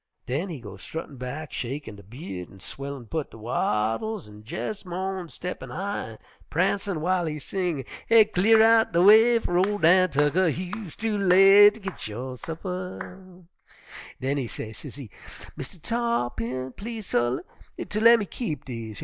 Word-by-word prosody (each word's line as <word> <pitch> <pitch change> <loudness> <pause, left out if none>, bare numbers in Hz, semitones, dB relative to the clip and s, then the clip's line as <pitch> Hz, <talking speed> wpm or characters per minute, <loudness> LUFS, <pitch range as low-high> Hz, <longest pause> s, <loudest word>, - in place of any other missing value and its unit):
"Den 150 +10 -2
he 160 -6 -6
go 105 -4 -10
struttin' 150 +5 -7
back, 140 +5 -6
shakin' 130 -2 -5
de 100 - -12
by'ud 95 - -8
an' 95 - -15
swellin' 140 +4 -7
put 155 +6 -3
de - - -13
wattles 115 - -1
an' 105 0 -13
jes' 210 - -4
mo'n 185 -1 -4
steppin' 180 +3 -6
high 200 - -3
an' - - -13 0.3
prancin' 195 +3 0
w'ile 175 +2 0
he 150 -1 -3
sing: 165 -2 -3 0.2
'Cle'r 220 -1 +6
outen 225 -3 +5
de 170 - +4
way 220 +4 +7
fer 175 -6 0
ol' 205 +3 +2
Dan 185 +1 +5
Tucker, 150 +5 +2
You'se 180 +3 -4
too 220 -2 -1
late 195 +2 +7
ter 220 - -13
git 195 - -6
yo' 125 +4 -6
supper.' 180 +3 -7 0.8
"Den 135 +2 -1
he 130 -4 -2
say, 110 +1 -6
sezee, 125 0 -9 0.4
'Mistah 135 +7 -8
Tarr'pin, 130 - -2
please, 220 0 -6
suh, 120 -3 +1 0.5
ter 210 - -2
lemme 230 -1 +6
keep 175 - -5
dese 115 -3 -6
yer? 110 - -9
175 Hz, 160 wpm, -26 LUFS, 130-200 Hz, 0.8 s, way